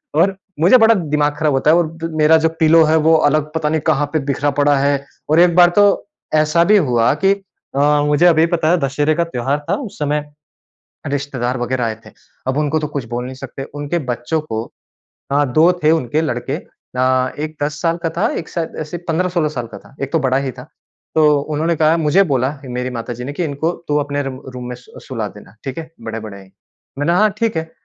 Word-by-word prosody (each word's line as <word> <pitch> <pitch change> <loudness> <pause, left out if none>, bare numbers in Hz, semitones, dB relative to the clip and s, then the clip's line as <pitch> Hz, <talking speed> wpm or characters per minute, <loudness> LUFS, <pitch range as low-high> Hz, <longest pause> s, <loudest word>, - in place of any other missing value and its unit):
और 190 +5 +3 0.2
मुझे 180 +11 +6
बड़ा 225 -1 +6
दिमाग 150 -4 0
खराब 155 -2 +1
होता 135 +3 +3
है - - +5
और 165 -1 -1 0.2
मेरा 155 +1 +6
जो 160 0 +2
पिलो 160 +1 +6
है 155 +1 +3
वो 160 +1 +5 0.2
अलग 150 +1 0
पता 160 -2 0
नहीं 155 0 0
कहाँ 145 +2 +2
पे 155 - +2
बिखरा 145 +1 0
पड़ा 145 0 +3
है। 140 0 +1 0.2
और 155 +2 +4
एक 175 -1 +5
बार 175 -1 +7
तो 205 - +7 0.5
ऐसा 155 +2 +3
भी 210 +3 +5
हुआ 125 - +2
कि 195 - +6 0.4
अ, 145 +1 +3
मुझे 150 +4 +3
अभी 165 -2 +5
पता 160 -2 0
है 180 - +4
दशहरे 145 +2 0
का 170 - +1
त्योहार 140 -2 -2
था 195 - +2
उस 230 -7 -8
समय 150 0 0 0.8
रिश्तेदार 135 -3 -2
वगैरह 125 +1 -1
आए 110 -1 -2
थे। - - -13 0.4
अब 130 +1 0
उनको 150 +1 +1
तो 150 - -3
कुछ 140 -4 -5
बोल 120 +1 -3
नहीं 130 +1 -7
सकते। 135 0 -8
उनके 145 +4 -2
बच्चों 120 +6 -2
को, 110 -7 -4 0.7
हाँ 140 -2 +1
2 165 +5 +5
थे 155 - +6
उनके 155 -2 +1
लड़के, 135 -2 -2
अ, 130 -4 -2
एक 155 +1 -4
10 150 +1 -4
साल 165 -1 +1
का 165 - 0
था, 185 - +2
एक 165 - -5
शायद 165 -2 -4
ऐसे 155 +2 -5
15-16 170 -1 0
साल 125 -6 -5
का 110 -3 -10
था, 135 - -19
एक 135 - -4
तो 165 - +3
बड़ा 130 -2 +1
ही - - -1
था। 125 0 -11 0.5
तो 155 -1 +4
उन्होंने 155 +3 -1
कहा, 155 +1 +3
मुझे 165 +4 +3
बोला 130 +1 +1
ही 135 - -10
मेरी 125 +1 -3
माताजी 120 0 -5
ने 140 - -5
कि 175 +4 -2
इनको 155 +2 -1 0.2
तू 150 - +1
अपने 145 0 -2
रू 135 -1 -6
रूम 125 -1 -6
में 125 - -5
सु 125 - -15
सुला 115 -5 -3
देना, 105 0 -15
ठीक 135 +1 -5
है? 160 -1 -7
बड़े-बड़े 110 -3 -7
हैं। 95 -1 -16 0.5
मैंने 145 +4 +1
हाँ 210 +4 +4
ठीक 225 -5 0
है। 160 0 -3
150 Hz, 225 wpm, -18 LUFS, 130-160 Hz, 0.8 s, बार